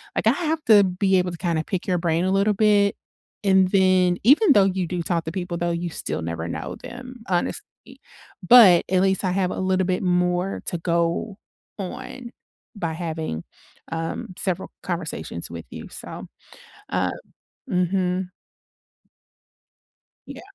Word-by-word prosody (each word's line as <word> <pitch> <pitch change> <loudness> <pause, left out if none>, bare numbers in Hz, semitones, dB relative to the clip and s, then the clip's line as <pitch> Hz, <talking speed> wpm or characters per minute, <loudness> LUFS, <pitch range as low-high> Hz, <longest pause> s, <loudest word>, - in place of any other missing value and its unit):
like, - - 0
I - - +7
have 320 -2 -2
to 215 -2 +8
be 190 +1 +1
able 180 0 +1
to 170 - -7
kinda 170 -2 0
pick 185 -3 -3
your 180 -2 +1
brain 170 0 0
a 190 - +1
little 200 +2 +3
bit, 205 -1 +3 0.5
and 190 -2 +4
then 185 -2 +3
even 290 - +6
though 205 - +6
you 190 -2 -1
do 175 0 -3
talk 170 -1 -1
to 160 - -4
people, 175 -1 -4
though, 175 0 -1
you 170 +1 -2
still 160 - -4
never 85 0 -4
know 85 - -5
them, 245 0 -10
honestly. 175 -2 -1 0.8
But 200 -8 +8
at 185 0 +3
least 190 0 +1
I 185 - +1
have 185 -1 0
a - - -4
little 190 0 +1
bit 185 -1 0
more 180 +1 0
to 175 - -3
go 170 +4 -1 0.4
on 235 +5 -7 0.4
by 170 -5 -3
having, 160 - -4 0.5
um, 165 0 -4
several 185 -3 -2
conversations 160 - -4
with 85 -1 -7
you. - - -8
So, - - -8 0.6
uh 90 0 0 0.6
Mhm. 180 0 0 2.0
Yeah. - - -9
180 Hz, 155 wpm, -23 LUFS, 170-195 Hz, 2.0 s, to